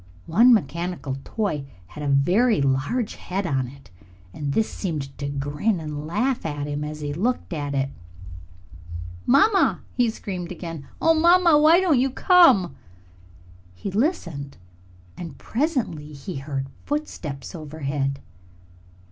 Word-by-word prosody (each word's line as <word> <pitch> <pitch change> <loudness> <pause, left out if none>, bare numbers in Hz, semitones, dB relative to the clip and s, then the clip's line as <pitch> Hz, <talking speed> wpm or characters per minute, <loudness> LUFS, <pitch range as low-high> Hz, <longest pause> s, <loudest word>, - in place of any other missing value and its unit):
One 230 +10 +6
mechanical 165 - 0
toy 195 -11 -2 0.2
had 150 - -10
a 145 - -2
very 185 - +3
large 140 - 0
head 190 +2 -3
on 135 -6 0
it, 140 -2 -15 0.4
and 145 +4 -3
this 220 - +2
seemed 150 -7 -4
to 140 - -3
grin 145 +8 -1
and 150 -1 -5
laugh 240 +9 0
at 145 -2 -3
him 145 0 -3
as 150 0 -6
he 145 -1 -3
looked 220 +4 -1
at 145 -3 -3
it. 135 0 0 1.4
"Mamma!" 385 - +4
he 245 -2 +2
screamed 185 -5 -5
again. 165 -5 -7
"Oh, 325 0 +4
mamma, 340 +1 +5
why 315 +3 +6
don't 340 -9 +3
you 265 +2 +2
come?" 290 - +5 1.0
He 195 - -5
listened 175 - -1 0.6
and 170 -2 -8
presently 220 - -2
he 140 +4 -6
heard 135 -1 -3 0.2
footsteps 175 - -4
overhead. 140 -4 -3
165 Hz, 130 wpm, -24 LUFS, 145-240 Hz, 1.4 s, One